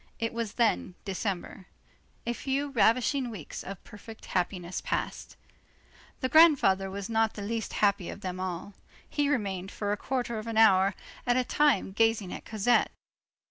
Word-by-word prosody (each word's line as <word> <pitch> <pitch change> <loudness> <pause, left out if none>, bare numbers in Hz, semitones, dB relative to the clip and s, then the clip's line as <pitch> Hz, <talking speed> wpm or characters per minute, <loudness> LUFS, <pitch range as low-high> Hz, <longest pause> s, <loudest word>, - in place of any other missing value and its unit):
It 230 0 -2
was 230 -2 -3
then 225 -6 +1
December. 195 -1 -4 0.6
A 235 - 0
few 275 +3 -2
ravishing 250 +2 +2
weeks 200 -10 -7
of 195 -1 -8
perfect 220 +2 -12
happiness 180 -1 -2
passed. - - -3 0.8
The 260 - +1
grandfather 260 - +5
was 200 0 -5
not 225 -1 +1
the 205 - -5
least 225 +1 -3
happy 200 -3 +1
of - - -8
them 185 -1 -4
all. 185 +2 -4 0.3
He 290 -1 0
remained 195 -8 -1
for 205 0 -3
a 205 - 0
quarter 245 -1 -2
of 215 - -8
an 225 -1 -3
hour 195 -3 +5 0.3
at 245 0 +3
a 255 - +3
time 285 -7 +2
gazing 225 -2 +1
at - - -8
Cosette. 220 +3 +2
215 Hz, 160 wpm, -29 LUFS, 195-240 Hz, 0.8 s, grandfather